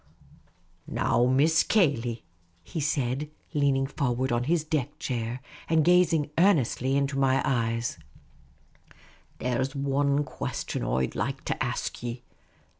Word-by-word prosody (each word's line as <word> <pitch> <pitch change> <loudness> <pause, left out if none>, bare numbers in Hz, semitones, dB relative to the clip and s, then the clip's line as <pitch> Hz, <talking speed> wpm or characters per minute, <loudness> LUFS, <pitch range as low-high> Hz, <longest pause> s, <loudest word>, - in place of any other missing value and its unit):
" - - -38 0.2
Now, 120 - +1
Miss 150 +5 +4
Cayley," 125 - +1 0.4
he 160 - -5
said, 140 -1 -1 0.2
leaning 140 -3 +2
for 135 -2 -1
ward 130 +1 -1
on 120 +1 0
his 165 +1 +1
deck 150 -3 -2
chair, 120 0 -3 0.3
and 160 -2 +3
gazing 170 -4 +3
earnestly 140 - +3
into 140 0 0
my 135 -1 +3
eyes, 115 - -1 0.7
" - - -37 0.6
there 125 0 0
's 135 +2 -5
wan 140 +1 +1
question - - -4
I 65 +2 +1
'd - - -8
like - - -3
to - - -1
ask - - -3
ye. 120 0 -5
135 Hz, 140 wpm, -27 LUFS, 120-150 Hz, 0.7 s, Miss